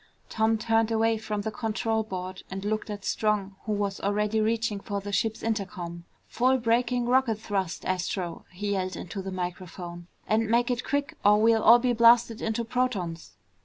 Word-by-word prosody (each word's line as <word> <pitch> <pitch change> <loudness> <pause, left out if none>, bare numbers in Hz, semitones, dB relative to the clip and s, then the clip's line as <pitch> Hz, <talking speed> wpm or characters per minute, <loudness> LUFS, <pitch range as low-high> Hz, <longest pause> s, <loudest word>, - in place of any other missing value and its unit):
Tom 220 0 +2
turned 225 0 +2
away 225 0 +2
from 215 -1 -3
the 220 - -3
control 225 +1 -1
board 185 -3 -6
and 195 +1 -5
looked 215 +1 -2
at 205 -2 -6
Strong 205 -2 0
who 215 - -2
was 205 -1 -1
already 210 +2 +1
reaching 220 -1 0
for 200 0 -4
the 200 +1 -6
ship's 220 +2 -1
intercom. 180 -6 -3 0.2
"Full 255 +2 +2
braking 240 +1 +1
rocket 250 -2 +3
thrust, 195 -4 -3
Astro," 180 -2 -2
he 205 +3 -3
yelled 185 -1 -1
into 185 +3 -6
the 190 0 -6
microphone, 175 -1 -6 0.2
"and 220 0 +1
make 240 +2 +3
it 245 0 -1
quick 285 +2 -2
or 210 +1 +6
we'll 225 0 +4
all 235 +2 +8
be 245 0 +1
blasted 235 -1 +5
into 225 +1 -1
protons!" 215 -9 -2
215 Hz, 175 wpm, -27 LUFS, 195-230 Hz, 0.2 s, all